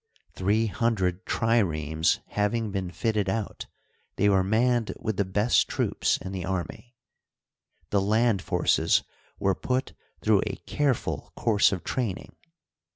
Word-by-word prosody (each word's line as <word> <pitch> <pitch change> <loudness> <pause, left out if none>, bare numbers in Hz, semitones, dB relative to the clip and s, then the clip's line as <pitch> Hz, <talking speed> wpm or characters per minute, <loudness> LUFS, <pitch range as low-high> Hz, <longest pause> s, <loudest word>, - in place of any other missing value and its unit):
Three 105 +4 +1
hundred 105 -4 -1
triremes 80 -9 +1
having 105 +1 0
been 95 -2 -3
fitted 105 0 -1
out, 110 0 -3 0.5
they 105 - +3
were 95 -2 +3
manned 115 +3 +1
with 110 -3 -3
the 100 - +1
best 105 +5 +2
troops - - 0
in 95 - -7
the 95 -2 -4
army. 95 +6 -5 1.0
The 100 - +3
land 110 0 +2
forces - - +2 0.3
were 95 - +1
put 130 +6 -2 0.3
through - - +3
a - - -3
careful 140 -5 -1
course 105 -3 +3
of 95 -3 -3
training. 115 -8 -3
105 Hz, 130 wpm, -27 LUFS, 95-115 Hz, 1.0 s, they